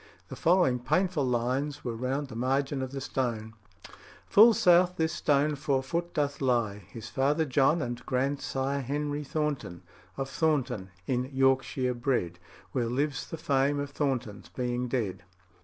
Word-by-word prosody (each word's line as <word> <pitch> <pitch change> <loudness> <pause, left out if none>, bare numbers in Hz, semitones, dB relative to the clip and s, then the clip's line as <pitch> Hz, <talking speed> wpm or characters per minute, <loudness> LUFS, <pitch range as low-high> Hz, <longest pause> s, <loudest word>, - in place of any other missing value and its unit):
The - - -6
following 170 -8 +3
painful 155 +3 +1
lines 130 +4 -1
were 120 -2 -2
round 130 +4 -2
the 110 - -9
margin 135 +3 0
of 130 -1 -4
the 135 0 -5
stone: 115 -5 -2 0.7
"Full 225 +2 +7
south 180 -3 +5
this 160 0 0
stone 150 -2 +2
four 135 -2 0
foot 170 +5 -3
doth 145 -1 -1
lie 120 -6 +1
His 115 -1 -8
father 145 +4 +1
John 145 +4 +2
and 120 -1 -5
grandsire 135 +1 -1
Henry 145 +2 -2
Thornton, 145 - -3 0.3
of 135 - -2
Thornton, 135 - 0 0.2
in 125 -1 0
Yorkshire 135 -1 +2
bred, 120 -9 -1 0.3
Where 120 -3 0
lives 135 +3 -1
the 165 - -5
fame 140 -1 +1
of 145 0 -4
Thornton's 130 -8 -2
being 125 0 -2
dead." 115 -7 -2
135 Hz, 150 wpm, -29 LUFS, 125-145 Hz, 0.7 s, Full